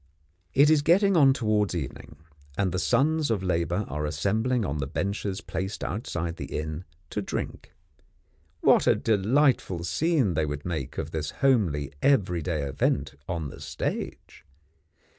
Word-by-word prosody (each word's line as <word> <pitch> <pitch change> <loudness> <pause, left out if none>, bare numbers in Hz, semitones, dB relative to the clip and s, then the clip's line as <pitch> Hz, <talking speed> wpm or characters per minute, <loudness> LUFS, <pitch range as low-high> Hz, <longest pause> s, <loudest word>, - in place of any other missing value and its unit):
It 145 +3 +6
is 155 -2 +5
getting 190 +6 +4
on 140 -5 +6
towards 105 -6 +1
evening, 75 -1 -6 0.4
and 95 -2 +1
the 90 - -1
sons 155 - +2
of 105 -5 0
labour 90 +2 0
are 75 +2 -3
assembling 110 +8 0
on 75 -3 -2
the 70 - -2
benches 100 +4 -2
placed 95 +2 -4
outside 85 -5 -3
the - - -5
inn, 80 +3 -4 0.3
to - - -2
drink. - - -5 0.9
What - - +5
a - - +6
delightful 110 - +2
scene 125 - +1
they 75 -1 0
would 75 0 -5
make 80 -8 -4
of - - -3
this 75 -2 -3 0.2
homely 80 - +2
everyday 90 - +1
event 70 0 0 0.2
on 80 -4 -2
the - - -11
stage! - - -5
95 Hz, 145 wpm, -27 LUFS, 80-125 Hz, 0.9 s, It